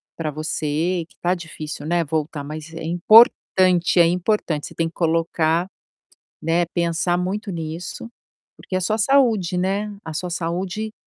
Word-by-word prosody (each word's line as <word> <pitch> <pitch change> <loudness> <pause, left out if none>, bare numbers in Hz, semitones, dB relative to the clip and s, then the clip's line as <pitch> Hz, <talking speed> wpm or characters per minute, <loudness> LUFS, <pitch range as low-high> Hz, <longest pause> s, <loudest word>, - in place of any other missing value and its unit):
para 160 -2 -3
você, 155 +3 -2
que - - -24
está 175 +1 0
difícil, 155 -4 -7
né, 170 0 +1
voltar 150 -1 -3
mas 155 +2 -8
é 165 - -6
importante, 180 -1 +4
é 170 - +8
importante. 175 -3 0
Você - - -13
tem 165 -1 0
que 165 - -10
colocar 165 0 +1 0.7
né, 165 +2 +1
pensar 170 0 0
muito 195 +4 -3
nisso, 170 +5 -6 0.5
porque 185 - -5
é 185 - 0
sua 215 +5 0
saúde, 220 -7 +3
né, 200 +3 -1
a 160 - -6
sua 180 +2 -3
saúde 185 +6 -3
175 Hz, 150 wpm, -22 LUFS, 160-185 Hz, 0.7 s, é